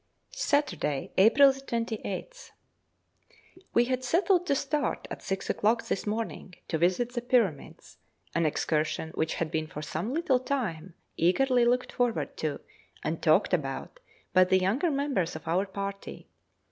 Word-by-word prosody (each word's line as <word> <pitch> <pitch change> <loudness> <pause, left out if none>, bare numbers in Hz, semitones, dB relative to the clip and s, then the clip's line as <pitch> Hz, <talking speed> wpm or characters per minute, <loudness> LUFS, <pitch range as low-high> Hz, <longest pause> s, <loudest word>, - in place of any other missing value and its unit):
Saturday, 180 - 0
April 270 +8 +7
28th. 235 - -5 1.3
We 235 - +5
had 255 0 -1
settled 355 +6 +2
to 280 - +2
start 285 +2 -1
at - - -6
six 195 0 -3
o'clock 230 +3 +1
this 200 - -2
morning 210 -4 -4
to 160 - -1
visit 185 +8 +1
the 240 - -2
Pyramids, 230 - -1 0.3
an 170 -1 +2
excursion 155 +1 -1
which 160 0 -1
had 165 -2 -2
been 155 0 -1
for 150 0 -7
some 165 +9 -3
little 280 -4 +2
time 190 - -3 0.2
eagerly 245 +8 +3
looked 250 +1 +1
forward 245 -2 -1
to - - -3 0.4
and - - -2
talked - - +3
about - - -2 0.3
by 185 - +7
the 185 +1 +3
younger 210 - +1
members 275 - -1
of - - -9
our 185 +5 +1
party. 200 0 -6
220 Hz, 145 wpm, -28 LUFS, 180-265 Hz, 1.3 s, April